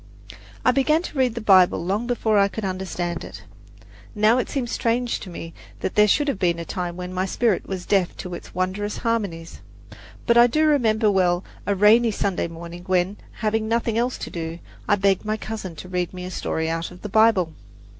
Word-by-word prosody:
I 255 Hz, -, +6 dB
began 305 Hz, +6 st, +2 dB
to -, -, -7 dB
read 250 Hz, -3 st, +2 dB
the 235 Hz, -, -4 dB
Bible 185 Hz, -4 st, +5 dB
long 205 Hz, +6 st, -1 dB
before 220 Hz, -4 st, +2 dB
I 200 Hz, -, +5 dB
could 210 Hz, +1 st, -5 dB
understand 180 Hz, -2 st, -3 dB
it. -, -, -10 dB, 0.7 s
Now 215 Hz, +4 st, +4 dB
it -, -, -2 dB
seems 250 Hz, -4 st, -2 dB
strange 235 Hz, +1 st, 0 dB
to 190 Hz, -, -9 dB
me 165 Hz, -1 st, -8 dB, 0.3 s
that -, -, -2 dB
there 210 Hz, 0 st, +5 dB
should 290 Hz, +8 st, +2 dB
have 270 Hz, -9 st, -1 dB
been 170 Hz, -2 st, +1 dB
a 170 Hz, -, -5 dB
time 175 Hz, -1 st, -4 dB
when 180 Hz, 0 st, -6 dB
my 185 Hz, +1 st, -1 dB
spirit 220 Hz, -1 st, 0 dB
was 185 Hz, -2 st, -5 dB
deaf 190 Hz, -3 st, +1 dB
to 180 Hz, -2 st, -6 dB
its 175 Hz, -, -9 dB
wondrous 190 Hz, +3 st, -2 dB
harmonies; 200 Hz, -9 st, -3 dB, 0.6 s
but 235 Hz, 0 st, +5 dB
I 240 Hz, -, +8 dB
remember 230 Hz, -9 st, +3 dB
well 180 Hz, -2 st, +2 dB, 0.2 s
a 200 Hz, -, +2 dB
rainy 220 Hz, +4 st, +5 dB
Sunday 200 Hz, -4 st, -1 dB
morning 170 Hz, +1 st, -9 dB
when, 185 Hz, +2 st, +1 dB, 0.3 s
having 220 Hz, 0 st, +1 dB
nothing 230 Hz, 0 st, 0 dB
else 245 Hz, +2 st, 0 dB
to -, -, -7 dB
do, 165 Hz, -1 st, -5 dB, 0.3 s
I 205 Hz, -, +4 dB
begged 195 Hz, -1 st, +2 dB
my 215 Hz, 0 st, -1 dB
cousin 215 Hz, -6 st, -6 dB
to 180 Hz, -, -9 dB
read 180 Hz, 0 st, -2 dB
me 180 Hz, 0 st, -6 dB
a 185 Hz, -, -6 dB
story 160 Hz, -2 st, -2 dB
out 165 Hz, +1 st, -2 dB
of 180 Hz, 0 st, -14 dB
the -, -, -3 dB
Bible. 200 Hz, -6 st, +3 dB
200 Hz, 205 wpm, -23 LUFS, 180-230 Hz, 0.7 s, I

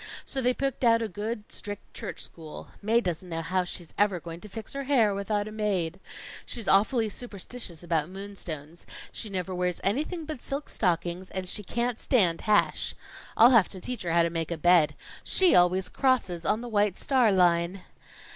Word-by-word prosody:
So 270 Hz, -, -2 dB
they 250 Hz, 0 st, +2 dB
picked 275 Hz, -1 st, -2 dB
out 230 Hz, -1 st, +5 dB
a -, -, -1 dB
good, 210 Hz, +3 st, -4 dB
strict, 205 Hz, -1 st, -7 dB
church -, -, -6 dB
school. 160 Hz, -2 st, -8 dB
Mae 225 Hz, +3 st, +3 dB
doesn't 180 Hz, -2 st, -4 dB
know 165 Hz, -1 st, -3 dB
how 185 Hz, +2 st, 0 dB
she's 175 Hz, -1 st, -7 dB
ever 200 Hz, -3 st, +3 dB
going 165 Hz, 0 st, -8 dB
to 210 Hz, -, -10 dB
fix 220 Hz, +2 st, -7 dB
her 275 Hz, 0 st, -4 dB
hair 240 Hz, -7 st, +3 dB
without 205 Hz, +1 st, -1 dB
a -, -, -7 dB
maid. 195 Hz, -5 st, -1 dB, 0.4 s
She's 230 Hz, -4 st, -6 dB
awfully 220 Hz, +4 st, +4 dB
superstitious 205 Hz, -5 st, -6 dB
about 165 Hz, -2 st, 0 dB
moonstones. 175 Hz, -5 st, -7 dB, 0.2 s
She 215 Hz, -, -4 dB
never 185 Hz, -1 st, -3 dB
wears 180 Hz, -1 st, -1 dB
anything 310 Hz, -, -1 dB
but 305 Hz, -5 st, -6 dB
silk 280 Hz, +1 st, -3 dB
stockings 175 Hz, -1 st, -1 dB
and 190 Hz, -1 st, -4 dB
she 210 Hz, -, -3 dB
can't 235 Hz, +4 st, -2 dB
stand 180 Hz, -10 st, +2 dB
hash. 210 Hz, -1 st, +2 dB, 0.4 s
I'll 235 Hz, +3 st, +8 dB
have 230 Hz, -7 st, +5 dB
to 190 Hz, -, -8 dB
teach 250 Hz, +6 st, -4 dB
her 170 Hz, -, -2 dB
how 170 Hz, 0 st, +4 dB
to 165 Hz, -, 0 dB
make 165 Hz, -1 st, -2 dB
a 170 Hz, -, -3 dB
bed. 160 Hz, -3 st, +4 dB, 0.3 s
She 375 Hz, -2 st, +4 dB
always 180 Hz, +1 st, +4 dB
crosses 245 Hz, -11 st, 0 dB
on 215 Hz, -, +2 dB
the 245 Hz, -, -6 dB
White 205 Hz, -4 st, +1 dB
Star 255 Hz, -6 st, +3 dB
Line." 180 Hz, 0 st, +2 dB
195 Hz, 190 wpm, -28 LUFS, 175-230 Hz, 0.4 s, I'll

